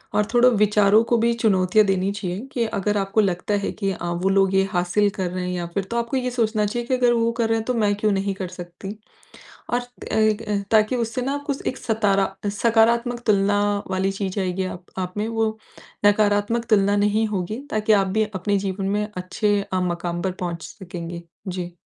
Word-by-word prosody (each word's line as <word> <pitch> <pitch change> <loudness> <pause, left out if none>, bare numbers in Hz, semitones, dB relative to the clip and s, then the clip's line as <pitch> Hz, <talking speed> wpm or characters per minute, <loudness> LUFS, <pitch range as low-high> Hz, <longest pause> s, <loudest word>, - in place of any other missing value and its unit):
और 210 0 +3
थोड़ा 245 +1 +6
विचारों 210 -1 +4
को 235 +1 +1
भी 235 +1 +2
चुनौतियाँ 210 -2 +3
देनी 195 0 +1
चाहिए 195 -2 -4
कि 235 -2 0
अगर 210 -1 -1
आपको 195 +2 +1
लगता 190 0 -1
है - - -1
कि 195 -2 -2
अ, 180 - -5
वो 175 +2 0
लोग 195 0 +3
ये 195 - +5
हासिल 180 +4 +2
कर 185 -2 -1
रहे 180 0 -3
हैं - - -2
या 175 -1 -3
फिर 200 - +1
तो 235 - -1
आपको 235 +3 -1
ये 250 -1 -1
सोचना 220 -3 +1
चाहिए 235 +3 -3
कि - - 0
अगर 245 -1 +3
वो 230 0 +2
कर 225 -1 +2
रहे 225 - +2
हैं 220 - -3
तो 250 - 0
मैं 210 -3 +2
क्यों 210 +1 +1
नहीं 195 0 0
कर 190 -1 -4
सकती? 180 +3 -8 0.8
और 245 0 +1 0.3
एगए 215 -1 +1
ताकि 220 +2 +3
उससे 230 +1 -2
ना 275 +3 -1
कुछ 280 -2 -2
एक 260 - -1
सतारा 200 -4 +1 0.2
सकारात्मक 235 +3 +2
तुलना 205 -1 +3 0.3
वाली 190 +1 0
चीज़ 195 0 -3
आएगी 185 0 -1
आप 185 -1 -6
आप, 185 -1 -3
में 210 +1 -1
वो 225 -1 -1 0.5
नकारात्मक 205 +2 +2
तुलना 200 -1 +4
नहीं 210 +2 +2
होगी 205 +1 -3
ताकि 215 0 +1
आप 200 -2 +4
भी 220 - +4
अपने 200 +2 0
जीवन 195 0 -3
में 210 +1 0
अच्छे 205 +3 0
अ, 185 - +1
मकाम 175 -1 -2
पर 190 - -1
पहुँच 170 -2 -3
सकेंगे। 175 -3 -7 0.3
जी। 180 -1 -4
205 Hz, 205 wpm, -23 LUFS, 190-225 Hz, 0.8 s, थोड़ा